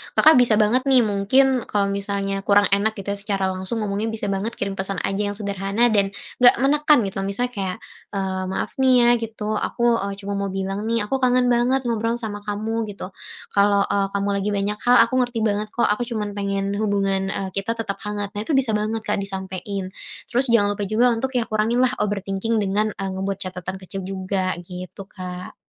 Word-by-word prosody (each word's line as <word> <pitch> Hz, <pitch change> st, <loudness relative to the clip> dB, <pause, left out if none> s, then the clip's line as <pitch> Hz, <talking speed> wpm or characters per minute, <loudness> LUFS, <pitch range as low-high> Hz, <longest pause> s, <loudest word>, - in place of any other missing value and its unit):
Kakak 310 Hz, -4 st, +7 dB
bisa 235 Hz, -3 st, +5 dB
banget 230 Hz, +6 st, +2 dB
nih, 260 Hz, -3 st, +6 dB
mungkin 235 Hz, +5 st, +2 dB
kalau 200 Hz, -1 st, 0 dB
misalnya 200 Hz, 0 st, -2 dB
kurang 200 Hz, +1 st, +4 dB
enak 205 Hz, +2 st, +2 dB
gitu 200 Hz, -1 st, -4 dB
ya 200 Hz, -, -2 dB
secara 195 Hz, -2 st, -1 dB
langsung 190 Hz, +4 st, -2 dB
ngomongnya 205 Hz, +2 st, -2 dB
bisa 220 Hz, -2 st, -2 dB
banget 205 Hz, +4 st, -2 dB
kirim 200 Hz, 0 st, -3 dB
pesan 190 Hz, -2 st, -1 dB
aja 195 Hz, 0 st, -1 dB
yang 205 Hz, -, -3 dB
sederhana, 200 Hz, +3 st, 0 dB
dan, 200 Hz, -2 st, +1 dB, 0.2 s
nggak 245 Hz, -1 st, +7 dB
menekan 295 Hz, +2 st, +4 dB
gitu. 195 Hz, -, -5 dB
Misalnya 245 Hz, +5 st, -1 dB
kayak, 190 Hz, -5 st, -3 dB, 0.4 s
eee, 190 Hz, -1 st, -2 dB
maaf 190 Hz, -, -3 dB
nih 260 Hz, -1 st, +5 dB
ya -, -, +5 dB
gitu, 215 Hz, -1 st, -3 dB
aku, 235 Hz, -1 st, +1 dB
eee, 200 Hz, +1 st, -3 dB
cuma 200 Hz, +1 st, -3 dB
mau 200 Hz, -, -1 dB
bilang 195 Hz, +1 st, -3 dB
nih, 230 Hz, -1 st, +1 dB
aku 270 Hz, -, +1 dB
kangen 250 Hz, -1 st, +3 dB
banget 250 Hz, +3 st, +2 dB
ngobrol 230 Hz, -1 st, 0 dB
sama 220 Hz, -3 st, -5 dB
kamu, 220 Hz, +2 st, -2 dB
gitu. 200 Hz, -2 st, -7 dB, 0.4 s
Kalau, 200 Hz, 0 st, +3 dB
eee, 200 Hz, 0 st, 0 dB
kamu 200 Hz, 0 st, 0 dB
lagi 200 Hz, +1 st, -1 dB
banyak 200 Hz, +1 st, -1 dB
hal, 245 Hz, -, +7 dB
aku -, -, -4 dB
ngerti 245 Hz, -2 st, 0 dB
banget 210 Hz, 0 st, 0 dB
kok 240 Hz, -, +1 dB
aku 230 Hz, +3 st, -1 dB
cuman 215 Hz, -3 st, -3 dB
pengen 200 Hz, -1 st, -2 dB
hubungan, 195 Hz, -2 st, 0 dB
eee, 195 Hz, -1 st, -3 dB
kita 195 Hz, +4 st, -2 dB
tetap 220 Hz, -3 st, -4 dB
hangat. 205 Hz, -1 st, -4 dB
Nah 205 Hz, -1 st, -4 dB
itu 305 Hz, -, +1 dB
bisa 265 Hz, -4 st, +2 dB
banget 215 Hz, +1 st, -1 dB
Kak 210 Hz, -1 st, -1 dB
disampein, 190 Hz, 0 st, -5 dB, 0.4 s
terus 250 Hz, +3 st, +2 dB
jangan 215 Hz, -4 st, +3 dB
lupa 205 Hz, -1 st, -3 dB
juga 235 Hz, +4 st, +3 dB
untuk 260 Hz, +3 st, -2 dB
ya 245 Hz, -, +2 dB
kurangin 225 Hz, +3 st, +1 dB
lah 255 Hz, -, +3 dB
overthinking 200 Hz, +2 st, -1 dB
dengan, 205 Hz, +2 st, 0 dB
eee, 195 Hz, 0 st, -4 dB
ngebuat 195 Hz, +1 st, -3 dB
catatan 185 Hz, -1 st, -6 dB
kecil 195 Hz, +1 st, -6 dB
juga, 190 Hz, 0 st, -2 dB
gitu, 180 Hz, +2 st, -9 dB
Kak. 180 Hz, -1 st, -8 dB
205 Hz, 200 wpm, -22 LUFS, 195-230 Hz, 0.4 s, Kakak